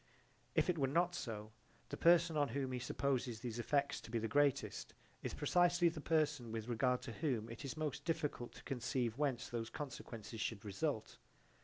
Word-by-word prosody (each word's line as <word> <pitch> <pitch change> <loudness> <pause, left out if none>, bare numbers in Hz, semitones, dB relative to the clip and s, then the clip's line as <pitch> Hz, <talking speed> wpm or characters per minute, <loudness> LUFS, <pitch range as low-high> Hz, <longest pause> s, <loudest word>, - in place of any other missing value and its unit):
If - - +4
it 175 -3 +1
were 135 - +3
not 175 +5 +2
so, 110 -9 -4 0.4
the - - -3
person 170 -1 +5
on 145 -1 +3
whom 130 +1 -1
he 125 - -1
supposes 125 -2 0
these 120 -1 -4
effects 140 +3 +1
to - - -11
be 115 - 0
the 115 0 0
greatest 145 +1 +1 0.3
is - - -3
precisely 175 -1 +4
the 160 -2 -6
person 150 -7 +1
with 110 0 -3
regard 125 +1 +1
to 120 - -5
whom 120 -3 -1
it 115 - -7
is 140 +2 -4
most 150 -2 -2
difficult 150 -7 -1
to - - -12
conceive 125 -2 -1
whence 140 -5 +1
those 115 -1 -3
consequences 115 -6 -6
should 110 -1 -2
result. 110 +4 -2
135 Hz, 185 wpm, -38 LUFS, 115-150 Hz, 0.4 s, person